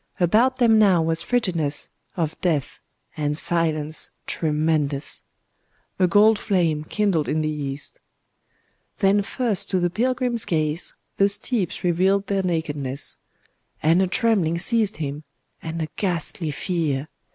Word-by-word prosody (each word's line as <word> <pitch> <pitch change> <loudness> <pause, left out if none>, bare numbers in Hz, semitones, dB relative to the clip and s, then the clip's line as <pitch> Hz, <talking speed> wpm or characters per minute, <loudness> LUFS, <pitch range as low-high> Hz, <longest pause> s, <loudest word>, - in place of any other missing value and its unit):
About 225 +9 +3
them 230 -3 +4
now 195 -5 +5
was 165 0 0
frigidness 170 -12 -1 0.3
of 160 -3 -1
death,—and 150 -2 -3
silence 155 -2 0 0.2
tremendous….A 155 +3 -2
gold 210 +4 +5
flame 170 -7 0
kindled 185 -3 0
in 155 - 0
the 155 0 -1
east. 145 -1 -2 1.0
Then 200 0 +3
first 220 0 0
to 185 - +1
the 175 -1 0
pilgrim's 245 +2 +1
gaze 155 0 -2 0.2
the 200 0 +4
steeps 205 -2 -1
revealed 190 +3 +2
their 195 -1 0
nakedness;—and 160 +1 -3
a 190 - +2
trembling 185 -5 +1
seized 220 +2 +2
him,—and 150 +2 -7
a - - -3
ghastly 170 -3 -2
fear. 150 -2 -2
170 Hz, 115 wpm, -23 LUFS, 155-200 Hz, 1.0 s, now